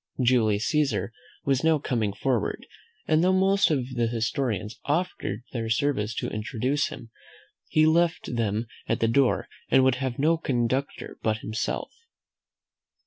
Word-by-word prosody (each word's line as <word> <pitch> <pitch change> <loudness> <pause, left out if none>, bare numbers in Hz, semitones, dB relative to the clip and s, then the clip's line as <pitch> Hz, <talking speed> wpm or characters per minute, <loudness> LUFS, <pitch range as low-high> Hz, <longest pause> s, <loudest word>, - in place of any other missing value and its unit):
Julius 115 -4 +3
Caesar 140 -8 0 0.3
was 135 0 +1
now 160 -1 +4
coming 115 -7 -1
forward; 120 0 -1 0.4
and 155 +1 +3
though 185 - +4
most 195 +1 +3
of 135 -6 0
the 120 -2 +1
historians 115 -2 -2
offered 145 - -2
their 115 -2 -3
service 115 -3 0
to - - -2
introduce 125 +6 -1
him, 115 -2 -10 0.6
he 155 0 +3
left 165 -4 +2
them 110 -1 0 0.2
at - - 0
the 115 - +2
door, 125 +2 +2 0.2
and 130 - +5
would 130 -1 +3
have 130 -2 -2
no 160 +4 +3
conductor 130 -2 -2
but 110 -1 +1
himself. 110 +1 -3
125 Hz, 140 wpm, -26 LUFS, 115-145 Hz, 0.6 s, and